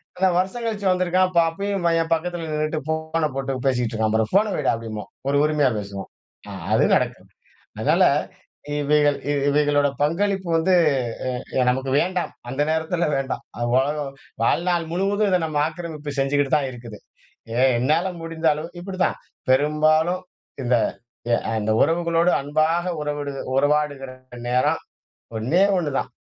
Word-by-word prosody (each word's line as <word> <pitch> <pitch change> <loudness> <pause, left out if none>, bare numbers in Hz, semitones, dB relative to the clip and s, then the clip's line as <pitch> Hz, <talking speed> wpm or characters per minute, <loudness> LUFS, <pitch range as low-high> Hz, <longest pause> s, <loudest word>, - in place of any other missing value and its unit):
இத்தன 190 0 +2
வருஷம் 190 +6 -1
கழிச்சு 205 -3 -2
வந்துருக்கான், 185 0 +2
ப - - +6
அப்பயும் 195 +1 -3 0.2
என் 165 0 -4
பக்கத்துல 165 0 -2
நின்னுட்டு, 155 +1 -1
போன 160 0 0
போட்டு 135 0 -2
பேசிட்டு 125 -3 0
இருக்கான் 110 -1 0
பாரு! 110 0 +3
ஃபோன 205 +2 +3
வைடா, - - +1
அப்படிம்போம். 110 -2 -7 0.2
ஒரு 140 - +2
உரிமையா 150 -3 +3
பேசுவோம். 100 -1 -6 0.4
ஆ, - - -7 0.2
அது - - +4
நடக்கும். - - -2 0.5
அதனால - - +3 0.8
இவைகள் 145 0 +3 0.3
இவைகளோட 145 0 +3
பங்களிப்பு 190 +4 0
வந்து 165 +3 +2 0.6
எ - - 0 0.3
எ - - +4
நமக்கு 130 +1 0
வேண்டாம். 180 0 -1 0.2
அந்த 135 +4 -1
நேரத்துல 160 +2 0
வேண்டாம். 135 -1 -3 0.2
அ - - -6 0.2
உலகம் 140 +1 -1 0.3
வாழ்நாள் 170 +7 +1
முழுவதும் 200 +3 +1
இத 185 - +3
நம்ம 155 -2 -2
ஆக்கிரமிப்பு 155 -2 -6
செஞ்சுகிட்டுதான் 140 +1 +2
இருக்குது. 115 -4 -10 0.6
எ - - -1 0.2
என்னால 155 +9 +2
முடிந்த 165 0 -4
அளவு 155 +2 -6
இப்டித்தான், 185 0 -1 0.3
பெரும்பாலும் 155 +5 +3 0.4
இந்த 125 0 +2 0.7
அ - - -1
இந்த 110 +1 +1
உறவுகளோடு 170 +1 +2
அன்பாக 155 +4 +1 0.2
உறவுடு 145 -1 -3 0.2
உறவாடுகிற 145 -1 +1 0.4
நேரம் 125 +1 +2 0.6
ஒண்ணே 130 - +2 0.2
ஒண்னுதான். 150 -6 -1
155 Hz, 135 wpm, -23 LUFS, 135-175 Hz, 0.8 s, ப